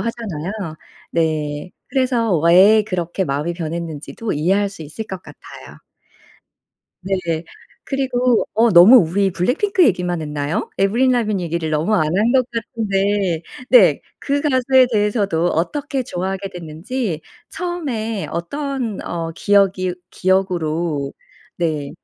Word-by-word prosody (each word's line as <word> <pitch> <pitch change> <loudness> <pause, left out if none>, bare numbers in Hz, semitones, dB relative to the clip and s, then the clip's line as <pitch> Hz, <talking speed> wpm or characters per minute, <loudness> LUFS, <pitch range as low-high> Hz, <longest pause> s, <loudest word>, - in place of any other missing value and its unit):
하잖아요. 205 -7 -4 0.6
네. 155 0 -1 0.2
그래서 245 -7 +1
왜 190 +6 +6
그렇게 185 -2 -3
마음이 145 +5 -2
변했는지도 165 +4 -5
이해할 190 +7 +1
수 195 -5 -10
있을 160 +9 -7
것 190 -2 -7
같아요. - - -13 1.2
네. 195 +1 -1 0.7
그리고 255 -3 +1
어 230 +1 +4
너무 185 +8 +9
우리 190 +2 +1
블랙핑크 335 - +2
얘기만 180 -5 +1
했나요? 150 0 -3
에이브릴 235 +7 +3
라빈 215 -6 +1
얘기를 170 -2 -2
너무 155 +8 +1
안 185 - +3
한 220 +4 +3
것 255 -2 +3
같은데 200 -6 -1 0.3
네 - - +6 0.2
그 285 0 0
가수에 260 -2 +4
대해서도 205 -5 +1
어떻게 275 - -1
좋아하게 190 -1 -4
됐는지 175 +3 -4 0.3
처음에 255 - -3
어떤 245 - -3
어 165 -1 -4
기억이 195 -2 +2 0.2
기억으로 170 -6 0 0.4
네 155 -4 -2
195 Hz, 270 characters per minute, -19 LUFS, 170-230 Hz, 1.2 s, 너무